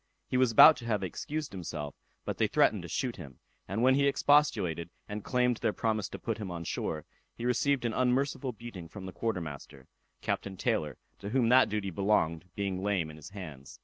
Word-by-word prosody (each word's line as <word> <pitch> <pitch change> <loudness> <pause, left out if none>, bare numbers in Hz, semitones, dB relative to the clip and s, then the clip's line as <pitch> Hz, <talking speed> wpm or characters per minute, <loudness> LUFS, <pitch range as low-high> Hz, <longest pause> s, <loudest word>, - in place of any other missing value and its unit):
He - - -3
was 125 -2 +4
about 150 +7 +9
to 120 - -9
have 105 -4 0
excused 150 - -4
himself, 75 -6 -5 0.3
but - - -4
they - - +4
threatened - - +3
to - - -8
shoot - - -2
him; 65 -3 -10 0.3
and 100 +6 -1
when 130 +1 +6
he 140 +1 +3
expostulated, 110 - +2 0.2
and 105 0 -5
claimed 125 -2 +1
their 110 -2 0
promise 110 -3 -1
to - - -7
put 115 -1 -3
him 100 -3 -4
on 85 -1 -5
shore, 80 -2 -3 0.3
he 120 - -5
received 125 +1 +1
an 115 - 0
unmerciful 130 +2 +1
beating 110 -7 -9
from 95 +3 -9
the 95 - -6
quarter 110 -5 -2
master; 75 -4 -9 0.3
Captain 95 -1 -3
Taylor, - - -1 0.2
to 100 - -6
whom 120 0 +2
that 130 +1 +6
duty 100 -2 -2
belonged, 90 -3 +1
being 95 -2 -2
lame 95 -6 0
in - - -12
his 80 - -10
hands. 80 -9 -9
105 Hz, 205 wpm, -30 LUFS, 90-125 Hz, 0.3 s, about